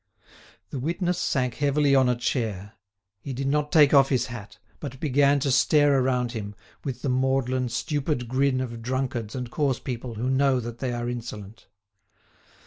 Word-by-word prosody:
The 135 - -4
witness 175 +5 -1
sank 125 -3 0
heavily 145 -1 +2
on 130 -2 +4
a 125 - +2
chair. 110 -5 -2 0.5
He 135 +6 -6
did 135 +2 -3
not 150 +1 0
take 150 -4 +6
off 135 -1 +6
his 130 -3 +1
hat, 105 -4 -9 0.2
but 130 - -7
began 140 -1 +3
to 140 - +1
stare 145 +1 +4
around 125 -2 0
him, 105 -3 -6 0.3
with 135 -4 -5
the 140 - 0
maudlin, 130 -1 +1
stupid 140 +1 -2
grin 130 +1 +1
of 120 -2 -5
drunkards 125 -2 -3
and 125 -2 -5
coarse 135 -2 0
people 120 -3 -6
who 115 +4 -2
know 135 0 +3
that 120 0 -7
they 130 -2 -2
are 120 0 -3
insolent. 115 -3 -7
130 Hz, 170 wpm, -25 LUFS, 120-140 Hz, 0.5 s, take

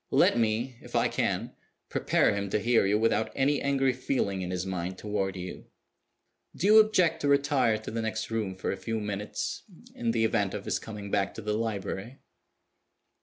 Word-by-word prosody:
Let - - +4
me, 115 +2 0
if - - -10
I - - +4
can, - - -1 0.3
prepare - - +2
him 100 -1 -2
to 105 - +1
hear 115 -3 +3
you 105 +2 +3
without 110 0 +1
any 140 +1 +2
angry 135 -2 +2
feeling 120 -7 -1
in 90 - -4
his 90 0 -2
mind 95 0 -3
toward 100 -2 -2
you. 90 0 -7 0.9
Do - - -2
you 215 +2 +8
object 185 -7 +3
to 145 - 0
retire 140 -5 +3
to 110 - -7
the 115 +1 -2
next 110 0 -3
room 105 -4 -2
for 95 - -2
a - - -3
few 115 -1 -3
minutes 105 0 -4 0.3
in 120 - -2
the 115 -1 +2
event 105 -3 0
of 100 - -6
his - - 0
coming 105 -2 -8
back 100 -1 0
to 110 - -7
the 105 0 -1
library?" 110 +2 -3
110 Hz, 190 wpm, -28 LUFS, 100-125 Hz, 0.9 s, you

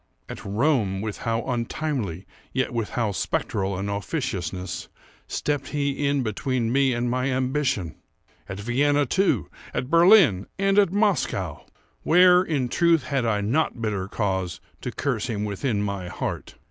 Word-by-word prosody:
—at - - -8
Rome, 105 -3 +1
with 105 -1 -4
how 115 0 0
untimely, 120 - -2 0.3
yet 130 -1 -1
with 115 -3 -2
how 115 -4 -1
spectral 95 0 -1
an 100 +2 -3
officiousness, 95 - -3 0.4
stepped 145 -2 -2
he 140 -1 -1
in 140 -2 +1
between 115 +2 -1
me 135 0 +3
and 120 0 -1
my 125 +2 0
ambition! 130 - 0 0.6
At 95 +1 -5
Vienna, 145 +6 +2
too—at 130 - -1
Berlin—and 185 - +5
at 200 -4 +3
Moscow! 185 - 0 0.3
Where, 180 +1 +6
in 150 -8 -1
truth, 165 +3 +3
had 130 -3 -1
I 105 -2 +1
not 125 +5 0
bitter 105 -4 -2
cause 95 -4 -2 0.2
to - - -4
curse - - -2
him 105 -3 -2
within 105 +1 -1
my 100 -3 -3
heart? - - -5
120 Hz, 140 wpm, -25 LUFS, 100-145 Hz, 0.6 s, Where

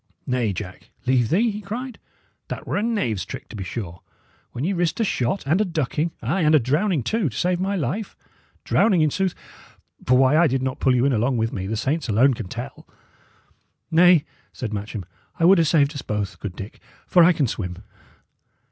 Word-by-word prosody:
"Nay, 125 -4 0
Jack, 95 -1 -8 0.2
leave 125 -3 +2
thee!" 215 +8 +2
he 210 +1 -6
cried. 240 +5 -6 0.5
"That - - -6
were - - -3
a - - +1
knave's 135 - -1
trick, - - -8
to - - -9
be 100 - -4
sure, 90 -3 -6 0.5
when 125 - -5
ye 190 +5 0
risked 175 +1 -1
a - - +3
shot 155 - -1
and 165 +9 +2
a - - +4
ducking, 160 -3 -1
ay, 155 +12 0
and 155 -1 +4
a - - +6
drowning 150 - 0
too, 210 - 0
to 110 - -9
save 180 0 +1
my 195 +2 -1
life. 185 - -3 0.5
Drowning, 195 -7 +3
in 155 - +2
sooth; 190 +2 -1 0.7
for 125 0 +5
why 130 +2 +4
I 170 - +5
did 130 -1 -1
not 130 -1 -3
pull 130 -1 +3
you 125 +1 +2
in 140 - +2
along 120 +3 +1
with 115 0 -1
me, 95 -1 -4
the 110 +2 -2
saints 135 +4 -1
alone 125 +6 +4
can 115 -4 -6
tell!" 120 +7 -8 1.0
"Nay," 170 -1 +6 0.3
said 110 -4 -5
Matcham, 105 -1 -5 0.3
"I 165 - +3
would 190 +1 +7
'a' 165 - +4
saved 145 -2 +3
us 140 - -5
both, 105 -2 -4
good 100 -4 -6
Dick, 100 +2 -9 0.3
for 175 - +5
I 175 - +7
can 155 -5 +1
swim." 90 -6 -4
140 Hz, 210 wpm, -23 LUFS, 115-175 Hz, 1.0 s, would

